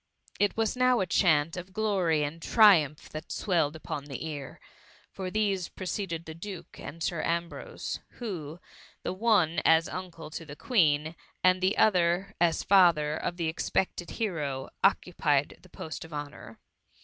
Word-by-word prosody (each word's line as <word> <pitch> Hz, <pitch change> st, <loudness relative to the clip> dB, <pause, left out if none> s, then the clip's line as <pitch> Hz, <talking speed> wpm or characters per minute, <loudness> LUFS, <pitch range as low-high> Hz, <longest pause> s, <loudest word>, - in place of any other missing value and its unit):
It 205 Hz, +1 st, +2 dB
was 225 Hz, +1 st, +1 dB
now 255 Hz, -1 st, +3 dB
a 190 Hz, -, +1 dB
chant 160 Hz, -3 st, +2 dB
of 180 Hz, +1 st, -8 dB
glory 185 Hz, -8 st, +1 dB
add 160 Hz, +3 st, -6 dB
triumph 165 Hz, -, +5 dB
that 155 Hz, -, -8 dB
swelled 165 Hz, -6 st, 0 dB
upon 145 Hz, -2 st, -6 dB
the 140 Hz, +1 st, -6 dB
ear, 145 Hz, -4 st, -7 dB, 0.5 s
for 190 Hz, -1 st, -5 dB
these 200 Hz, -3 st, 0 dB
preceded 180 Hz, -3 st, -4 dB
the 160 Hz, -, -7 dB
duke 180 Hz, +2 st, -9 dB
and 165 Hz, +1 st, -7 dB
Sir 170 Hz, -1 st, -1 dB
Ambrose; 170 Hz, +1 st, -3 dB
who, 175 Hz, -9 st, -6 dB, 0.4 s
the -, -, -2 dB
one 185 Hz, -6 st, +2 dB
as 160 Hz, +1 st, +5 dB
uncle 175 Hz, -4 st, -7 dB
to 165 Hz, -, -6 dB
the 145 Hz, -2 st, -10 dB
Queen, 155 Hz, -, +2 dB, 0.3 s
and 185 Hz, 0 st, +4 dB
the 190 Hz, +2 st, +1 dB
other 185 Hz, -1 st, +3 dB
as 165 Hz, -2 st, +2 dB
father 170 Hz, -6 st, +4 dB
of 175 Hz, +2 st, -3 dB
the 165 Hz, -2 st, -1 dB
ex 160 Hz, -, -3 dB
pected 180 Hz, -2 st, -1 dB
hero, 150 Hz, -, -2 dB
occupied 150 Hz, -7 st, +1 dB
the 185 Hz, -, -18 dB
post 160 Hz, -2 st, -7 dB
of 165 Hz, -, -12 dB
honour. 145 Hz, -6 st, -7 dB
170 Hz, 160 wpm, -28 LUFS, 155-190 Hz, 0.5 s, triumph